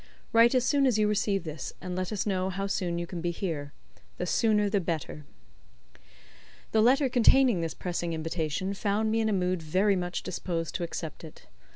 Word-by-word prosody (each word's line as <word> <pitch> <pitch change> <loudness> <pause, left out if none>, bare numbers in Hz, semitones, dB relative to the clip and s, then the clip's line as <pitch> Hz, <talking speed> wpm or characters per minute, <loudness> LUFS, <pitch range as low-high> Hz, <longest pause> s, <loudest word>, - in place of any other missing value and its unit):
Write 230 +2 +6
as 250 -1 +3
soon 275 0 +3
as 240 -4 +2
you 210 -1 +3
receive 205 -2 0
this, 155 -4 -6
and 180 0 -5
let 185 +1 -3
us 210 - -2
know 190 -2 0
how 195 +1 -3
soon 180 -3 -1
you 170 - -2
can 170 -1 -6
be 175 - -1
here, 160 -5 -4 0.5
the - - -2
sooner 210 -2 +2
the 200 0 +1
better." 160 -3 -4 1.5
The 220 - +3
letter 265 +5 +4
containing 245 -4 +4
this 165 -1 -3
pressing 175 -1 -3
invitation 165 +3 -2
found 210 +2 0
me 225 - +1
in 220 - +1
a - - 0
mood 185 -2 0
very 190 +6 +2
much 180 -1 -3
disposed 165 -3 -3
to 180 - -2
accept 165 -1 -6
it. 160 - -12
185 Hz, 195 wpm, -28 LUFS, 170-215 Hz, 1.5 s, Write